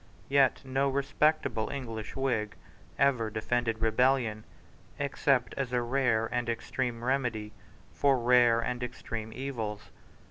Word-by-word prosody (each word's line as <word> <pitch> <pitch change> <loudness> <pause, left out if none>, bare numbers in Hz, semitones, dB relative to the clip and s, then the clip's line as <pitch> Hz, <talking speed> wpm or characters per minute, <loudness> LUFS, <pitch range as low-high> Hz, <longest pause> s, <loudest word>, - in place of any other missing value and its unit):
Yet 135 -1 +3
no 135 +1 +1
respectable 140 -3 +1
English 115 -6 -6
Whig 120 -6 -1 0.4
ever 125 -5 +2
defended 115 +1 -1
rebellion, 115 -1 +2 0.5
except 140 -2 +1
as 135 -3 -2
a 120 -1 +1
rare 120 -3 +1
and 120 -1 -1
extreme 120 0 -3
remedy 120 -5 -1 0.4
for 140 -2 +3
rare 120 -1 +5
and 125 +1 -2
extreme 115 -2 -5
evils. 115 -5 -5
125 Hz, 115 wpm, -30 LUFS, 115-135 Hz, 0.5 s, rare